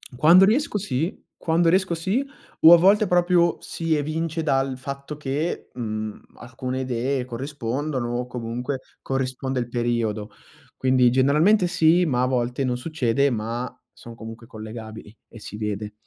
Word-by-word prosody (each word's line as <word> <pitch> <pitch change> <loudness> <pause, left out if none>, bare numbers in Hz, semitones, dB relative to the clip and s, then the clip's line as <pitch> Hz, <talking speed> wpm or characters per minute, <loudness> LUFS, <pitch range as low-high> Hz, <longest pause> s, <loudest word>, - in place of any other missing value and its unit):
Quando 170 +8 +7
riesco 230 +2 +1
sì 165 -3 -3 0.2
quando 165 +1 +2
riesco 185 0 +2
sì, 190 +11 -1 0.4
o 165 +2 +10
a - - +9
volte 200 +5 +4
proprio 175 -1 +3
si 165 -1 -2
evince 155 +2 -2
dal 135 -3 +1
fatto 140 +2 -7
che, 150 +4 -3
mhmm, 110 -3 -5 0.2
alcune 130 +1 -5
idee 130 +1 -1
corrispondono 130 0 -3
o 125 - -2
comunque 125 +2 -4 0.2
corrisponde 130 0 -2
il 120 - -3
periodo. 115 -3 -1 0.4
Quindi 130 -1 +3
generalmente 155 - +4
sì, 170 +1 +3
ma 125 -3 +1
a - - +3
volte 125 +1 -1
non 125 - 0
succede, 140 -1 0
ma 115 +2 -3 0.2
sono 115 +2 -12
comunque 115 +1 -10
collegabili 110 -1 -9
e 115 - -12
si 105 - -9
vede. 105 0 -4
130 Hz, 145 wpm, -23 LUFS, 120-160 Hz, 0.4 s, o